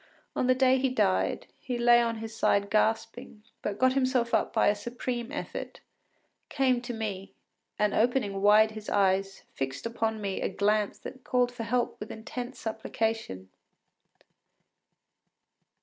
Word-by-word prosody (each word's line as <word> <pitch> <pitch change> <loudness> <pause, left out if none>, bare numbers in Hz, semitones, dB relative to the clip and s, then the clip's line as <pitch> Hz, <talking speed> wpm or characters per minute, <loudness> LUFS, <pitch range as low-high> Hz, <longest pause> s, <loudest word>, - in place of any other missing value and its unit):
On 250 - +1
the 255 - +4
day 260 0 +4
he 265 0 +1
died, 95 - +1
he 250 -1 -4
lay 240 0 +6
on 230 -1 -1
his 220 0 -7
side 200 -2 +1
gasping, 220 0 -1 0.2
but 205 -1 -3
got 260 0 +3
himself 255 -3 +1
up - - +2
by 225 - +3
a 205 - +5
supreme 240 +3 -4
effort, 295 - -6 0.7
came 255 -3 +2
to 250 0 -5
me, 210 -4 -5 0.4
and 210 -1 +1
opening 220 -4 +1
wide 210 +2 +6
his 215 -1 -8
eyes, 195 -1 +1
fixed 135 +5 -4
upon 225 -1 -1
me 200 -2 -3
a - - 0
glance 205 +2 +1
that 260 -1 -10
called 245 -1 +1
for 245 - -7
help 245 +2 -1
with 210 - -7
intense 245 +3 -6
supplication. 220 - -3
225 Hz, 150 wpm, -28 LUFS, 205-245 Hz, 0.7 s, lay